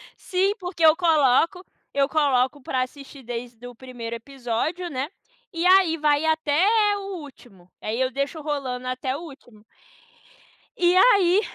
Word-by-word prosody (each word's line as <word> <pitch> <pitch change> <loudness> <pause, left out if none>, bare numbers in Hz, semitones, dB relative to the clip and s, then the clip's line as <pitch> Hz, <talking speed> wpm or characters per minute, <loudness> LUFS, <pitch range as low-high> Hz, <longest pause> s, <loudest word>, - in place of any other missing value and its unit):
Sim, 385 +2 0
porque 355 -3 -1
eu 315 0 +7
coloco 330 +2 +2 0.3
eu 275 0 +1
coloco 280 -2 +1
para 255 0 -2
assistir 275 +1 -8
desde 240 0 -7
o 245 - -11
1º 235 -2 -7
episódio, 270 +8 -4
né. 270 +3 -3 0.4
E 335 +1 -2
aí, 370 -3 +5
vai 295 -1 +1
até 315 +1 +2 0.3
o 390 -2 -6
último. 235 - -14
Aí 225 +4 -3
eu 260 - +1
deixo 280 +4 -3
rolando 265 -4 -4
até 255 +1 -3
o 295 - -7
último. 265 -9 -14 1.1
E 350 0 +3
aí 380 -2 +5
285 Hz, 145 wpm, -24 LUFS, 255-335 Hz, 1.1 s, eu